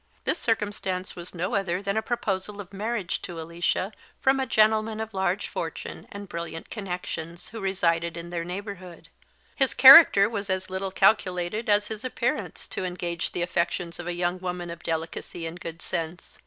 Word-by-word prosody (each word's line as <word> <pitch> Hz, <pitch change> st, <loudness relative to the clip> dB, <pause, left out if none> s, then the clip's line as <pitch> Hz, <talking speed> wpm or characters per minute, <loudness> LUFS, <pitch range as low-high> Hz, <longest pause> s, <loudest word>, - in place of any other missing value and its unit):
This -, -, 0 dB
circumstance 205 Hz, -5 st, -1 dB
was 175 Hz, +1 st, -10 dB
no 175 Hz, +2 st, -2 dB
other 190 Hz, -3 st, 0 dB
than 200 Hz, +1 st, -2 dB
a 220 Hz, -, +2 dB
proposal 210 Hz, -3 st, -2 dB
of 200 Hz, -1 st, -9 dB
marriage 205 Hz, -2 st, -2 dB
to 170 Hz, -2 st, -6 dB
Alicia 170 Hz, +4 st, -1 dB, 0.3 s
from 265 Hz, +1 st, +3 dB
a 265 Hz, -, 0 dB
gentleman 220 Hz, 0 st, +3 dB
of 220 Hz, -1 st, -4 dB
large 190 Hz, 0 st, 0 dB
fortune -, -, -5 dB
and 200 Hz, 0 st, -7 dB
brilliant 170 Hz, -1 st, -6 dB
connexions 180 Hz, -4 st, -5 dB
who 225 Hz, -, -7 dB
resided 170 Hz, -4 st, 0 dB
in 170 Hz, +1 st, -7 dB
their 170 Hz, -1 st, -2 dB
neighbourhood. 185 Hz, -1 st, -7 dB, 0.5 s
His 265 Hz, -7 st, +1 dB
character 270 Hz, -7 st, +10 dB
was 205 Hz, -2 st, -4 dB
as 185 Hz, 0 st, -1 dB
little 190 Hz, +1 st, -2 dB
calculated 190 Hz, +1 st, +2 dB
as 205 Hz, 0 st, +3 dB
his 220 Hz, +1 st, -6 dB
appearance 255 Hz, -, -2 dB
to -, -, -4 dB
engage 175 Hz, -2 st, -3 dB
the 175 Hz, -, -1 dB
affections 170 Hz, 0 st, -1 dB
of 175 Hz, -, -5 dB
a 175 Hz, -, -1 dB
young 175 Hz, +1 st, -1 dB
woman 180 Hz, -1 st, -4 dB
of 170 Hz, -, -8 dB
delicacy 165 Hz, +1 st, -4 dB
and 165 Hz, +2 st, -6 dB
good 165 Hz, 0 st, -7 dB
sense. 170 Hz, +1 st, -5 dB
185 Hz, 175 wpm, -26 LUFS, 175-205 Hz, 0.5 s, character